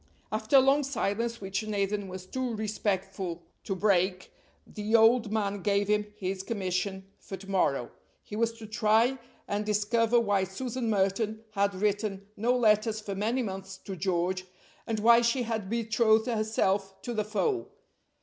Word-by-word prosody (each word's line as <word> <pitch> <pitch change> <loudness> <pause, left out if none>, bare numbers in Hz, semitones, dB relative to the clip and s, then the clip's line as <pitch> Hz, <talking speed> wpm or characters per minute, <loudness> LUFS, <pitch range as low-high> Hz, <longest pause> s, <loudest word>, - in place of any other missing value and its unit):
After 215 +4 0
a - - +10
long 275 +2 +4
silence, 235 -3 -1
which 195 +1 -2
Nathan 205 -1 -1
was 185 0 -7
too 250 +3 -3
respectful 195 -4 -2 0.2
to 195 - -2
break, 185 -1 +1 0.3
the 215 +2 -2
old 225 0 +5
man 205 -2 -1
gave 200 +1 +1
him 210 0 +2
his 190 -1 -3
commission 190 -2 -2
for 195 - -8
to 195 +1 -13
morrow. 140 -11 +1 0.3
He 210 - -8
was 230 +1 +1
to 225 -1 -10
try 220 +4 +2 0.3
and 205 +1 -1
discover 220 +3 +2
why 205 -4 +1
Susan 235 +5 -3
Merton 210 +2 0
had 200 -1 +1
written 205 0 -1
no 245 +4 +1
letters 215 -1 +3
for 210 -2 -5
many 225 +6 0
months 195 -2 -6
to 190 0 -7
George; 185 +1 -1 0.4
and 225 -2 -1
why 235 +2 +6
she 240 +2 +1
had 220 -4 -3
betrothed 225 -1 +2
herself 205 -4 0
to 240 - -3
the 215 -2 0
foe. 340 - -1
210 Hz, 160 wpm, -29 LUFS, 195-230 Hz, 0.4 s, a